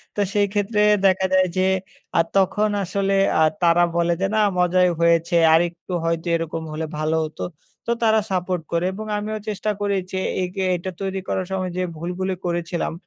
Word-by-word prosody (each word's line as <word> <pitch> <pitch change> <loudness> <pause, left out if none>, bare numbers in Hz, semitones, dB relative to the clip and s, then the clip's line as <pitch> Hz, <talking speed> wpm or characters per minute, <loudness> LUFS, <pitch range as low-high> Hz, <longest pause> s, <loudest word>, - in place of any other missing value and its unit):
তো 205 - 0
সেই 205 -1 +3
ক্ষেত্রে 210 +1 +1 0.2
দেখা 190 0 +3
যায় 185 0 +4
যে, 185 0 +3 0.5
আর 165 - +4
তখন 195 +3 +2
আসলে 195 +2 -1 0.3
আ - - +4 0.2
তারা 170 0 +4
বলে 170 0 +2
যে, - - +2
"না, - - +3 0.2
মজাই 180 0 +3
হয়েছে 170 +1 +3 0.2
আরেকটু 175 +2 0
হয়তো 165 +1 -1
এরকম 165 0 -3
হলে 155 +1 -3
ভালো 155 +1 0
হতো।" 155 - -9 0.4
তো - - -1
তারা 220 -1 +4
support 180 -2 -1
করে 170 +1 0
এবং 215 +3 -6
আমিও 215 +1 -3
চেষ্টা 215 0 -2
করি 205 -1 0 0.2
যে, 190 - -3 0.3
একে 185 +2 -4
এটা 180 +2 -4
তৈরি 195 0 -2
করার 185 - -1
সময় 185 -1 -2
যে, - - 0 0.2
ভুলগুলি 180 +3 -3
করেছিলাম, 170 -1 -2
185 Hz, 180 wpm, -22 LUFS, 170-195 Hz, 0.5 s, যায়